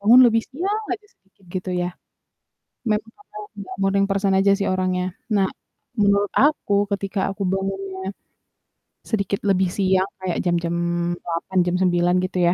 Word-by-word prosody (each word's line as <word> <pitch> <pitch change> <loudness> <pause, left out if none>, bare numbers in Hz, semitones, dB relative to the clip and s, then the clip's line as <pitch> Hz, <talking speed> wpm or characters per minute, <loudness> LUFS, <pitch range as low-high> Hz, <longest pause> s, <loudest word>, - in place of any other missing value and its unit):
Bangun 230 +5 +7
lebih 225 -1 +3
siang 390 +10 -2
aja 420 - -6
sedikit, 195 0 -30
gitu 185 0 -3
ya. 175 - -1 1.0
Memang 215 +1 0
karena 410 - -24
aku - - -33 0.2
gak - - -8
morning 195 0 +3
person 195 0 +1
aja 195 +1 +4
sih 200 - -1
orangnya. 185 -1 0 0.3
Nah, 195 -2 +3 0.5
menurut 200 0 +3
aku 290 -8 +2 0.2
ketika 195 0 -3
aku 195 - -5
bangunnya 195 0 -3 1.0
sedikit 200 -3 0
lebih 190 -1 +3
siang 190 -1 +3
kayak 185 -2 -1
jam-jam 170 -1 +1 0.5
8 170 +3 -3
jam 175 - +1
9 175 -1 +3
gitu 185 0 -3
ya. 175 - +4
195 Hz, 155 wpm, -22 LUFS, 185-205 Hz, 1.0 s, Bangun